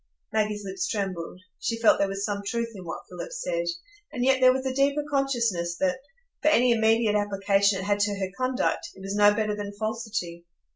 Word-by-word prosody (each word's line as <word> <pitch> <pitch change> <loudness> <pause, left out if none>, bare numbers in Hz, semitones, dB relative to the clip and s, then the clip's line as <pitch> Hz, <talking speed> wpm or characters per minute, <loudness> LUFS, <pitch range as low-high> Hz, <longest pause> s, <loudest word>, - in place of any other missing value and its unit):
Maggie's 210 -1 0
lips 190 -1 -3
trembled; 185 -4 -4 0.2
she 230 - -1
felt 230 -1 +4
there 200 - +3
was 195 +1 -3
some 205 -1 -2
truth 230 +3 -2
in 190 -3 -10
what 165 - -6
Philip - - -7
said, 170 - -2 0.4
and 245 - -1
yet 265 0 +3
there 255 0 +8
was 260 +1 -2
a 260 - -1
deeper 280 +2 +2
consciousness 235 -12 0
that, 270 -2 0 0.4
for - - +1
any 250 -5 +5
immediate 225 -1 +3
application 200 -1 +2
it 190 - -4
had 205 +1 +1
to 205 0 +1
her 190 -1 -3
conduct, 255 +6 -1
it - - -13
was 195 +1 -4
no 205 0 +6
better 210 0 0
than 205 -1 -5
falsity. 215 -5 -4
210 Hz, 200 wpm, -26 LUFS, 195-245 Hz, 0.4 s, there